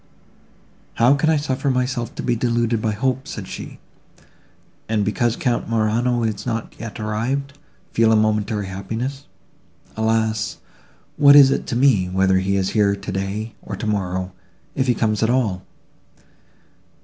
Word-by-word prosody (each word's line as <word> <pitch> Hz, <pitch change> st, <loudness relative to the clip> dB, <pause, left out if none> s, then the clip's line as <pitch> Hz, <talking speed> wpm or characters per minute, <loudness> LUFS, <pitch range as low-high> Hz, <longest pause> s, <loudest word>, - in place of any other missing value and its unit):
"How 120 Hz, +4 st, +5 dB
can 145 Hz, +3 st, +1 dB
I 160 Hz, -, +3 dB
suffer 140 Hz, -1 st, -1 dB
myself 125 Hz, -2 st, -1 dB
to -, -, -5 dB
be 120 Hz, -, +1 dB
deluded 115 Hz, -1 st, 0 dB
by 110 Hz, -1 st, 0 dB
hope," 130 Hz, +4 st, -1 dB
said -, -, -6 dB
she, -, -, -8 dB, 1.1 s
"and, 105 Hz, -2 st, +1 dB
because 115 Hz, +3 st, 0 dB
Count 120 Hz, -3 st, -1 dB
Morano 115 Hz, +2 st, +1 dB
is 110 Hz, -3 st, -2 dB
not 115 Hz, -2 st, -3 dB
yet 110 Hz, -2 st, -7 dB
arrived, 130 Hz, +7 st, -3 dB, 0.3 s
feel 115 Hz, 0 st, +3 dB
a -, -, +5 dB
momentary 105 Hz, -1 st, +1 dB
happiness? 115 Hz, +9 st, -5 dB, 0.7 s
Alas! 110 Hz, -1 st, 0 dB, 0.6 s
what 145 Hz, -1 st, +7 dB
is 140 Hz, -2 st, +8 dB
it 135 Hz, -, -1 dB
to 125 Hz, -, -2 dB
me, 120 Hz, -8 st, +3 dB
whether 95 Hz, 0 st, +2 dB
he 95 Hz, +1 st, 0 dB
is 95 Hz, -1 st, 0 dB
here 100 Hz, -2 st, +2 dB
today, 100 Hz, +2 st, -4 dB
or 100 Hz, -, -6 dB
tomorrow, 95 Hz, -3 st, -2 dB, 0.4 s
if 130 Hz, 0 st, -1 dB
he 125 Hz, -, +3 dB
comes 110 Hz, -1 st, 0 dB
at 110 Hz, -, +2 dB
all? 110 Hz, -8 st, 0 dB
110 Hz, 150 wpm, -21 LUFS, 105-125 Hz, 1.1 s, is